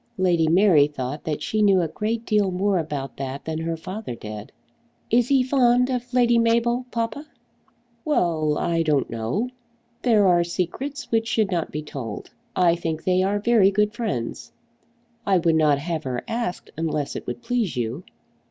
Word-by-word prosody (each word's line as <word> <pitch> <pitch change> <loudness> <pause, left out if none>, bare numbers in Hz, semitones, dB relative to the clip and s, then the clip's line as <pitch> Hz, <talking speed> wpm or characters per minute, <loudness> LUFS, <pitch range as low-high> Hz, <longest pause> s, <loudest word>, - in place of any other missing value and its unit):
Lady 175 -4 +2
Mary 165 -4 +5
thought 140 0 -5
that 155 -2 -3
she 215 - 0
knew 200 -3 +5
a 170 - +1
great 220 +8 -3
deal 210 -4 +2
more 190 +1 +1
about 145 -4 -5
that 135 0 -5
than 160 0 -3
her 165 0 -2
father 185 - -6
did. 105 -1 -8 0.6
"Is 240 +1 +4
he 270 -1 +4
fond 250 -1 +3
of 250 -1 -3
Lady 240 -2 +4
Mabel, 235 +2 +1
papa?" 235 +6 -3 0.8
"Well, 165 - +1
I 165 -1 0
don't 150 -4 +1
know. 115 - -2 0.5
There 220 -5 +4
are 175 -1 +4
secrets 185 - -4
which 225 0 +1
should 215 -3 +1
not 170 -3 -1
be 150 +1 -4
told. 125 -8 -7 0.2
I 175 -2 +4
think 165 -2 -3
they 185 0 +2
are 195 +2 +1
very 215 -2 +4
good 210 +2 +1
friends. 140 - -4 0.7
I 195 -4 +3
would 170 -1 +2
not 155 -3 +4
have 160 +1 -4
her 125 -2 -3
asked 230 -6 -3
unless 155 -3 -2
it - - -6
would 240 - -5
please 230 - -1
you." 120 +7 -3
180 Hz, 170 wpm, -23 LUFS, 155-230 Hz, 0.8 s, Mary